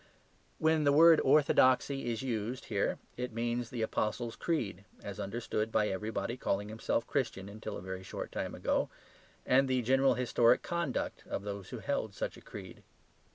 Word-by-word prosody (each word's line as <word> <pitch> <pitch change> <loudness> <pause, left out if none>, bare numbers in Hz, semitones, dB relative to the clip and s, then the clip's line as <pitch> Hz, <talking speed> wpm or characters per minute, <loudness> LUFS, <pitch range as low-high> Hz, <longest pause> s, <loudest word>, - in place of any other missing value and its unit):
When 160 -1 +3
the 140 - +4
word 160 +2 +7
"orthodoxy" 135 -2 +4
is 115 +2 -3
used 120 0 -3
here - - +1 0.2
it 125 -1 -4
means 120 +1 -1
the 120 -3 -2
Apostles' 115 +2 -1
Creed, 105 - -2 0.2
as 100 -1 -6
understood 110 +1 -2
by 105 -1 +2
everybody 105 +4 -3
calling 100 -3 -1
himself 115 +1 -1
Christian 115 -8 -2
until 105 +2 -6
a - - -9
very 95 0 -5
short 95 - -6
time - - -3
ago - - 0 0.6
and 135 +1 +4
the 130 -1 +1
general 135 +3 +4
historic 120 -1 +3
conduct 170 -7 -2
of 100 - -3
those 100 -2 -6
who - - -6
held - - -2
such - - -3
a - - -13
creed. - - -10
120 Hz, 165 wpm, -32 LUFS, 105-130 Hz, 0.6 s, word